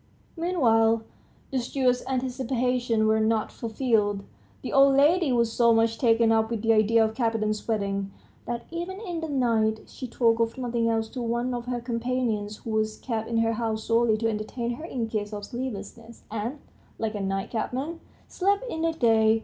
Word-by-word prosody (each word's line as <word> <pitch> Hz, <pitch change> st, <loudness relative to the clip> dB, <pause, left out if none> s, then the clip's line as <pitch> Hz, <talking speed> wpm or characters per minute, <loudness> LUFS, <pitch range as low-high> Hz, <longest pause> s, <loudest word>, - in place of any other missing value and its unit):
Meanwhile, 230 Hz, -10 st, +2 dB, 0.5 s
the 265 Hz, -, +1 dB
steward's 250 Hz, 0 st, +1 dB
anticipations 250 Hz, -2 st, 0 dB
were 220 Hz, 0 st, +3 dB
not 220 Hz, 0 st, +1 dB
fulfilled. 220 Hz, -4 st, 0 dB, 0.4 s
The -, -, -4 dB
old 275 Hz, 0 st, +6 dB
lady 310 Hz, +2 st, +4 dB
was 235 Hz, -2 st, +2 dB
so 235 Hz, -1 st, +4 dB
much 225 Hz, 0 st, +2 dB
taken 230 Hz, -2 st, +4 dB
up 220 Hz, 0 st, +2 dB
with 230 Hz, -2 st, -3 dB
the 225 Hz, 0 st, +4 dB
idea 220 Hz, +1 st, +4 dB
of 220 Hz, -, -2 dB
Kapiton's 220 Hz, -3 st, -1 dB
wedding, 200 Hz, -3 st, -1 dB, 0.4 s
that 240 Hz, -1 st, -3 dB
even 350 Hz, +3 st, -4 dB
in 355 Hz, -6 st, -4 dB
the 320 Hz, -, -4 dB
night 225 Hz, -5 st, +1 dB
she 255 Hz, -, -8 dB
talked 230 Hz, -1 st, +2 dB
of 230 Hz, +3 st, 0 dB
nothing 235 Hz, -2 st, 0 dB
else 225 Hz, -1 st, 0 dB
to 255 Hz, -, -6 dB
one 240 Hz, +2 st, -1 dB
of 240 Hz, -1 st, -4 dB
her 245 Hz, -1 st, -1 dB
companions, 230 Hz, -3 st, -2 dB
who 225 Hz, -, -7 dB
was 215 Hz, 0 st, 0 dB
kept 225 Hz, -3 st, -3 dB
in 230 Hz, -, 0 dB
her 225 Hz, 0 st, +2 dB
house 220 Hz, -1 st, -2 dB
solely 230 Hz, -1 st, +3 dB
to 225 Hz, +1 st, 0 dB
entertain 225 Hz, +2 st, -3 dB
her 310 Hz, +7 st, -7 dB
in 240 Hz, -8 st, -3 dB
case 215 Hz, -1 st, -3 dB
of 205 Hz, -1 st, -5 dB
sleeplessness, 230 Hz, -1 st, -7 dB
and, 225 Hz, +6 st, -3 dB, 0.4 s
like 225 Hz, -1 st, -2 dB
a 205 Hz, -, -3 dB
night 195 Hz, 0 st, -2 dB
cabman, 265 Hz, +8 st, -3 dB, 0.3 s
slept 400 Hz, +4 st, +1 dB
in 320 Hz, -, -3 dB
the 330 Hz, 0 st, +1 dB
day. 225 Hz, -5 st, +4 dB
230 Hz, 180 wpm, -26 LUFS, 220-255 Hz, 0.5 s, old